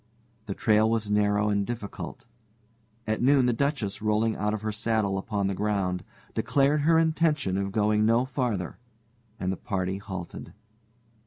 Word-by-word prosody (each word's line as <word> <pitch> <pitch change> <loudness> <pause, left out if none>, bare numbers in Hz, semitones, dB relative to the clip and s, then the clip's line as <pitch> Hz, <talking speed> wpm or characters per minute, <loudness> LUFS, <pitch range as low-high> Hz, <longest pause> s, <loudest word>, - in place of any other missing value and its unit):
The 100 - -3
trail 110 0 +3
was 110 -2 0
narrow 105 0 +2
and 100 -1 +1
difficult. 115 -2 -6 0.8
At 110 0 -1
noon 135 0 +5
the 125 - +2
Duchess, 115 -7 -1
rolling 110 +1 +1
out 105 +1 -1
of 110 -1 -3
her 110 - -1
saddle 110 -2 0
upon 100 +1 -2
the 100 - 0
ground, 95 -3 -1 0.3
declared 140 +6 +2
her 160 +2 +4
intention 160 - +2
of 100 0 -1
going 105 +1 +2
no 115 +3 +3
farther, 120 - -2 0.6
and 90 0 -1
the 95 - -3
party 95 -2 -2
halted. 95 -4 -7
105 Hz, 155 wpm, -27 LUFS, 100-120 Hz, 0.8 s, noon